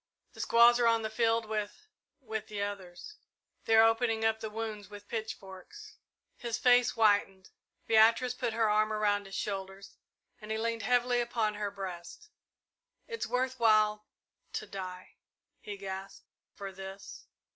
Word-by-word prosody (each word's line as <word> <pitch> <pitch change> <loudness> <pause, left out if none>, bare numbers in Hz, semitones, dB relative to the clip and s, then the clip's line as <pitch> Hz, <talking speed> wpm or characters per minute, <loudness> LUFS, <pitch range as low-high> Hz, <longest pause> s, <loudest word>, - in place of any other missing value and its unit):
The - - -15
squaws 235 +1 +6
are 235 - +4
on 230 -1 +3
the 220 - -3
field 230 0 +1
with 215 - -4 0.4
with 220 -4 -5
the 205 -1 -3
others. 200 - -7 0.5
They're 225 0 +6
opening 225 0 +2
up 220 0 +2
the 220 -1 -5
wounds 215 -2 -5
with 205 0 -10
with - - -36
pitchforks!" 220 - -8 0.4
His 235 -2 -3
face 245 -1 +4
whitened. 205 -4 +2 0.3
Beatrice 230 +3 +4
put 245 -2 -3
her 225 0 +2
arm 215 +1 +2
around 205 -2 0
his 195 - -8
shoulders, 195 -1 -5 0.4
and 210 - -10
he 220 - -1
leaned 230 0 -2
heavily 245 +2 +2
upon 230 -3 -1
her 205 -1 -3
breast. 195 - -8 0.8
"It's 460 -1 -4
worth 255 0 -1
while 215 -2 +3 0.5
to - - -3
die 185 -2 -8 0.2
" - - -55
he 205 -1 -7
gasped 195 0 -7 0.3
"for 195 -1 -7
this!" 190 +1 -10
220 Hz, 155 wpm, -31 LUFS, 200-230 Hz, 0.8 s, squaws